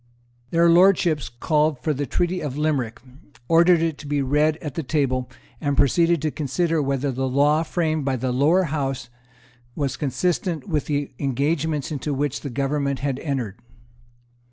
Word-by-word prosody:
Their 170 Hz, 0 st, +3 dB
Lordships 170 Hz, -3 st, +4 dB
called 150 Hz, +5 st, +1 dB
for 150 Hz, +5 st, -1 dB
the 145 Hz, 0 st, -3 dB
Treaty 175 Hz, +6 st, -1 dB
of 145 Hz, -2 st, -4 dB
Limerick, 140 Hz, -7 st, -1 dB, 0.5 s
ordered 170 Hz, 0 st, +5 dB
it 160 Hz, -3 st, -2 dB
to 145 Hz, -, -9 dB
be 145 Hz, -1 st, 0 dB
read 150 Hz, +3 st, +2 dB
at 150 Hz, -4 st, -6 dB
the 165 Hz, -, -3 dB
table, 130 Hz, -3 st, -1 dB, 0.3 s
and 145 Hz, -3 st, -1 dB
proceeded 165 Hz, +3 st, +3 dB
to 155 Hz, -, 0 dB
consider 160 Hz, +3 st, 0 dB
whether 140 Hz, 0 st, -1 dB
the 130 Hz, +1 st, -2 dB
law 145 Hz, +4 st, +3 dB
framed 160 Hz, -2 st, -1 dB
by 135 Hz, -1 st, 0 dB
the 130 Hz, +1 st, -2 dB
Lower 150 Hz, +9 st, +3 dB
House 135 Hz, -5 st, -3 dB, 0.7 s
was 140 Hz, -3 st, -2 dB
consistent 170 Hz, +4 st, -1 dB
with 155 Hz, -6 st, -1 dB
the 145 Hz, -1 st, -1 dB
engagements 145 Hz, +3 st, -1 dB
into 145 Hz, 0 st, -3 dB
which 145 Hz, 0 st, -1 dB
the 140 Hz, -, -5 dB
government 140 Hz, +1 st, -1 dB
had 135 Hz, -1 st, -2 dB
entered. 130 Hz, -, -3 dB
145 Hz, 160 wpm, -23 LUFS, 135-160 Hz, 0.7 s, ordered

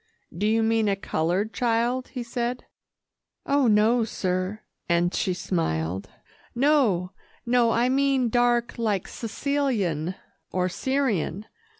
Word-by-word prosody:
"Do 205 Hz, +5 st, 0 dB
you 225 Hz, +1 st, +2 dB
mean 225 Hz, -1 st, +2 dB
a 200 Hz, -, +2 dB
coloured 190 Hz, +3 st, -1 dB
child?" 240 Hz, +2 st, 0 dB
he 250 Hz, -3 st, -5 dB
said. 240 Hz, +1 st, -3 dB, 0.8 s
"Oh, 280 Hz, -2 st, +3 dB
no, 220 Hz, +2 st, +4 dB
sir," 185 Hz, 0 st, -2 dB, 0.3 s
and 175 Hz, +1 st, +2 dB
she 185 Hz, -, 0 dB
smiled; 95 Hz, -, -2 dB, 0.5 s
"no, 240 Hz, -, +2 dB, 0.3 s
no 240 Hz, -1 st, +3 dB
I 235 Hz, +2 st, +2 dB
mean 265 Hz, -1 st, +2 dB
dark 240 Hz, 0 st, +1 dB
like 210 Hz, -5 st, 0 dB
Sicilian 220 Hz, -, -1 dB, 0.4 s
or 185 Hz, 0 st, 0 dB
Syrian. 225 Hz, -, -1 dB
225 Hz, 115 wpm, -25 LUFS, 185-245 Hz, 0.8 s, no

